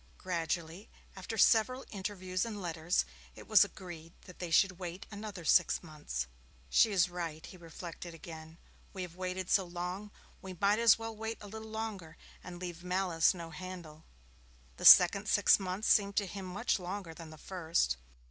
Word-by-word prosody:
Gradually, 170 +1 -3 0.3
after 195 +4 -6
several 255 +5 +4
interviews 190 -2 -3
and 220 -3 -5
letters, 170 -1 0 0.3
it - - -12
was 215 -2 +7
agreed 175 -4 -9
that 180 - -14
they 175 - -4
should 185 +2 +3
wait 180 +1 -6
another 205 -4 -7
six 180 +3 +4
months. 145 - -5 0.5
'She 225 - +5
is 180 -3 +3
right,' 170 -3 -5
he - - -11
reflected 170 0 -9
again. 160 0 -10 0.4
'We 190 -2 -4
have 175 -2 -9
waited 185 0 -4
so 195 - +4
long, 180 +3 -5 0.3
we 190 -1 -7
may 205 +3 +3
as 230 -2 +7
well 225 0 -6
wait 220 +1 -4
a 205 - -10
little 220 +2 -8
longer 215 -7 -6 0.3
and 180 -1 -8
leave 175 -1 -7
malice 180 -1 +2
no 165 -2 -8
handle.' 170 -2 -9 0.7
The - - -5
second - - +9
six - - +5
months 190 +2 -3
seemed 200 -1 +3
to 205 - +2
him 190 0 -7
much 200 +4 -1
longer 180 -1 -6
than 165 -1 -10
the 155 - -12
first. 160 - -1
185 Hz, 170 wpm, -32 LUFS, 170-200 Hz, 0.7 s, second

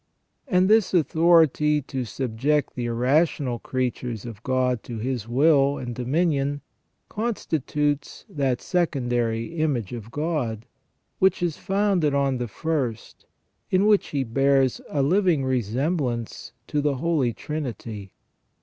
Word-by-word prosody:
And 185 -6 +3
this 215 -2 +3
authority 160 -2 +4
to 130 -1 -4
sub 120 0 -4
ject 145 +4 +1
the 120 - -3
irrational 125 +1 +1
creatures 125 -4 -3
of 115 -3 -8
God 130 -2 0
to 120 - -7
his 120 -1 -3
will 140 +2 +3
and 120 -1 -5
dominion 145 +2 0 0.5
con 225 +1 -2
stitutes 150 -2 -2
that 135 -4 -1
secondary 120 -5 -1
image 130 -10 -1
of 115 -2 -7
God, 135 -7 -2 0.5
which 190 -1 +3
is 170 -4 -1
founded 195 -7 +1
on 135 -2 +1
the 120 - -2
first, 130 -3 -3 0.4
in 185 +2 +3
which 210 -1 +4
he 140 -2 -1
bears 135 +1 +2
a 140 -2 0
living 170 -2 +2
resemblance 125 - -2
to 150 - -1
the 145 -1 +1
Holy 145 -3 +1
Trinity. 115 -8 -6
140 Hz, 130 wpm, -24 LUFS, 120-160 Hz, 0.5 s, authority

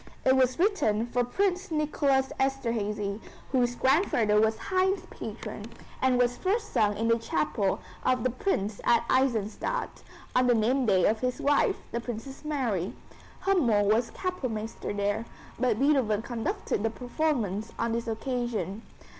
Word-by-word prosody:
It 260 - +5
was 255 -1 +3
written 335 - +2
for 245 +1 0
Prince 380 +8 0
Nicholas 285 -4 +1
Esterhazy, 220 -6 -1 0.3
whose 245 -2 +2
grandfather 240 - +3
was 220 0 +2
Haydn's 380 +1 0
patron, - - -7 0.3
and 260 -1 +3
was 245 0 +2
first 425 +4 -1
sung 205 -1 +2
in 225 +2 0
the 230 0 +3
chapel 190 -1 0 0.2
of 255 -2 +2
the 255 - +1
Prince 215 - -1
at 235 0 +3
Eisenstadt, 260 - 0 0.3
on 255 0 +4
the 245 - +5
name 245 +4 +2
day 190 -4 +4
of 220 +1 +2
his 250 +1 -1
wife, 285 0 +3 0.2
the 235 - -2
Princess 245 +4 -7
Marie. 240 - -1 0.5
Hümmel 230 - +3
was 230 +1 +1
Kapellmeister 255 - -4
there, 205 +2 -1 0.3
but 245 -3 +2
Beethoven 255 -6 +2
conducted 230 -4 -2
the 225 - +1
performance 235 - -2
on 230 - 0
this 230 +1 -2
occasion. 225 -4 -2
240 Hz, 145 wpm, -28 LUFS, 215-270 Hz, 0.5 s, It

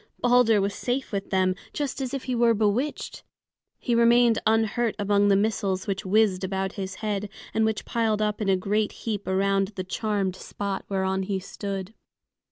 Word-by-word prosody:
Balder 245 -3 +4
was 200 +1 0
safe 250 +5 -2
with 200 -1 -3
them, 185 -1 +2 0.2
just 285 -2 -3
as 260 -2 -3
if 275 -2 -4
he 255 - -3
were 235 -1 +3
bewitched. 220 +8 -1 0.5
He 245 - -2
remained 235 0 +5
unhurt 225 +1 +1
among 205 0 +2
the 200 - +5
missiles 200 -2 0
which 195 -1 -3
whizzed 200 -2 +3
about 190 0 -2
his 190 -2 -5
head, 205 -1 -2 0.2
and 220 0 +2
which 220 -1 -1
piled 225 -2 0
up 210 0 -1
in 200 - 0
a 190 - +4
great 210 +3 0
heap 210 -3 -3
around 195 +1 +1
the 185 - -3
charmed 195 0 -1
spot 200 +1 -5
whereon 190 -1 0
he 190 0 -2
stood. 195 +1 -6
205 Hz, 175 wpm, -26 LUFS, 195-225 Hz, 0.5 s, remained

